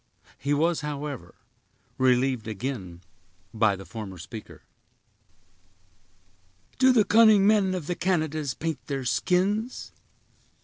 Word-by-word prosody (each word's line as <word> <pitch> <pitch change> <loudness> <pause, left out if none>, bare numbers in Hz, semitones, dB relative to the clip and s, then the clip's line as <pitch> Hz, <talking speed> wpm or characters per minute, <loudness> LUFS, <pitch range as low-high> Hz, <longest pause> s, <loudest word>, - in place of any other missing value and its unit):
He 140 - -2
was, 160 +3 +1
however, 145 -10 -6 0.6
relieved 130 -2 +2
again 105 -6 -5 0.5
by 110 -2 +2
the 95 0 -10
former 105 -5 -8
speaker. 100 +5 -10 2.2
"Do 260 0 +6
the 225 -5 +4
cunning 215 -2 +6
men 200 -3 +3
of 175 -5 -5
the 175 - -2
Canadas 155 -7 -1
paint 160 -6 -4
their 135 -2 -3
skins?" 185 - 0
145 Hz, 105 wpm, -26 LUFS, 115-185 Hz, 2.2 s, Do